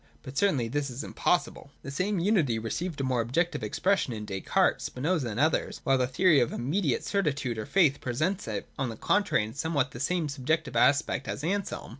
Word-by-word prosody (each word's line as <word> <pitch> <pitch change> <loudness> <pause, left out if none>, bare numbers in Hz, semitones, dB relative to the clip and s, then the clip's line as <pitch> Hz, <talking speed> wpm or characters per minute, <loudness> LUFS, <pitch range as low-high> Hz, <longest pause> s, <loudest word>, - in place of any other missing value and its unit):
But 130 - -9
certainly 140 -9 +2
this 145 +4 -2
is 125 +4 -6
impossible.) 175 -3 -1
The 140 - -6
same 185 +8 -1
unity 170 - +2
received 145 +9 -3
a - - -1
more 130 -2 +1
objective 165 +10 0
expression 195 -10 0
in 105 -1 -5
Descartes, 95 -2 +1
Spinoza 145 0 -1
and 110 +2 -4
others: 155 +3 +1
while 135 -1 +3
the 125 - +2
theory 155 +4 +4
of 120 - +1
immediate 145 +3 -1
cer 200 - +1
titude 140 - -2
or 110 - -5
faith 160 -8 +3
presents 160 - -1
it, - - -4
on 135 -3 0
the 115 - -7
contrary, 200 - +2
in 110 +1 -6
somewhat 140 -2 -1
the 120 - -9
same 170 +3 0
subjective 145 +1 -1
aspect 140 +2 +2
as - - -4
Anselm. 195 +4 -2
140 Hz, 200 wpm, -28 LUFS, 125-175 Hz, -, theory